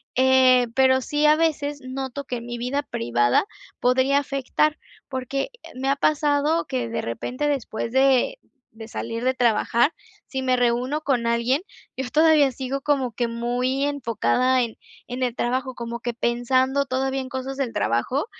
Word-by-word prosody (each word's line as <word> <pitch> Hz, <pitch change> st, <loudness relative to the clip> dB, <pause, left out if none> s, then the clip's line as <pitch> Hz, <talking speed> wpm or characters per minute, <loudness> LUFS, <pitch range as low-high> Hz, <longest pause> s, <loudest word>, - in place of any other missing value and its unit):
eh, 255 Hz, -1 st, +5 dB
pero 260 Hz, 0 st, +4 dB
sí 295 Hz, +3 st, 0 dB
a 300 Hz, -, +6 dB
veces 295 Hz, -3 st, 0 dB
noto 265 Hz, +1 st, -5 dB
que 250 Hz, -2 st, -3 dB
en 235 Hz, -, -8 dB
mi 240 Hz, -, -5 dB
vida 250 Hz, +4 st, -1 dB
privada 120 Hz, -, +1 dB, 0.3 s
podría 260 Hz, +3 st, +3 dB
afectar 285 Hz, +2 st, 0 dB, 0.3 s
porque 265 Hz, -, -3 dB, 0.3 s
me 265 Hz, +1 st, -2 dB
ha 275 Hz, -, +3 dB
pasado 295 Hz, +2 st, +1 dB
que 250 Hz, -3 st, -3 dB
de 230 Hz, -, -2 dB
repente, 250 Hz, -, -3 dB
después 240 Hz, -5 st, -2 dB
de 270 Hz, -, +3 dB, 0.4 s
de 225 Hz, 0 st, -9 dB
salir 230 Hz, +1 st, -5 dB
de 260 Hz, 0 st, +1 dB
trabajar, 235 Hz, +4 st, +2 dB, 0.3 s
si 265 Hz, -1 st, -4 dB
me 255 Hz, -1 st, +2 dB
reúno 245 Hz, +5 st, +1 dB
con 255 Hz, -6 st, 0 dB
alguien, 235 Hz, +6 st, +1 dB, 0.3 s
yo 260 Hz, -1 st, -4 dB
todavía 310 Hz, -2 st, +4 dB
sigo 265 Hz, +2 st, -4 dB
como 270 Hz, -4 st, 0 dB
que 240 Hz, +2 st, -1 dB
muy 245 Hz, +4 st, -1 dB
enfocada 255 Hz, -1 st, +1 dB
en 230 Hz, -2 st, -6 dB, 0.3 s
en 250 Hz, +1 st, -5 dB
el 245 Hz, -2 st, 0 dB
trabajo, 255 Hz, +1 st, -1 dB
como 235 Hz, 0 st, -5 dB
que 240 Hz, -1 st, -4 dB
pensando 255 Hz, +4 st, +1 dB
todavía 265 Hz, +1 st, -1 dB
en 260 Hz, -, -7 dB
cosas 265 Hz, 0 st, -4 dB
del 270 Hz, -4 st, -1 dB
trabajo, 210 Hz, -, 0 dB
260 Hz, 165 wpm, -23 LUFS, 240-275 Hz, 0.4 s, a